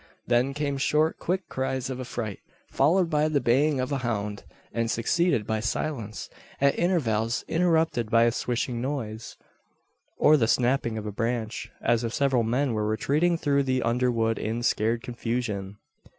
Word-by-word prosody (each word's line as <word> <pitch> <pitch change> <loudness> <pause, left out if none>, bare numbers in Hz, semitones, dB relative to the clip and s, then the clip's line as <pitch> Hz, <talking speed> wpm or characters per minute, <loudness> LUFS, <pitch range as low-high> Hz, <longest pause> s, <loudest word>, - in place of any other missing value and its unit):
Then 125 +3 +1
came 140 -2 -2
short, 155 +3 +1
quick 185 +2 -2
cries 130 -1 -2
of 130 - -5
affright, 120 -5 -5 0.3
followed 170 +6 +3
by 150 -1 +2
the 155 -2 +1
baying 135 +4 +2
of 130 +2 -2
a 140 - 0
hound, 105 -4 -3 0.3
and 115 -1 -1
succeeded 120 +2 +1
by 110 0 -1
silence, 115 -1 -3 0.3
at 140 0 +4
intervals 120 - 0
interrupted 160 -9 +1
by 115 0 +5
a 120 - +4
swishing 120 0 -2
noise, 120 -5 -4 0.8
or 155 +1 +6
the 115 -5 +2
snapping 120 -1 +1
of 110 - -5
a 105 - -3
branch 115 +1 -3
as 120 0 +2
if 115 0 -3
several 135 -3 +2
men 125 +3 0
were 105 -1 -1
retreating 150 +10 +1
through 140 -3 +2
the 130 -2 0
underwood 115 -1 +1
in 115 +2 -2
scared 115 +1 +1
confusion! 115 -5 -3
125 Hz, 160 wpm, -26 LUFS, 115-140 Hz, 0.8 s, or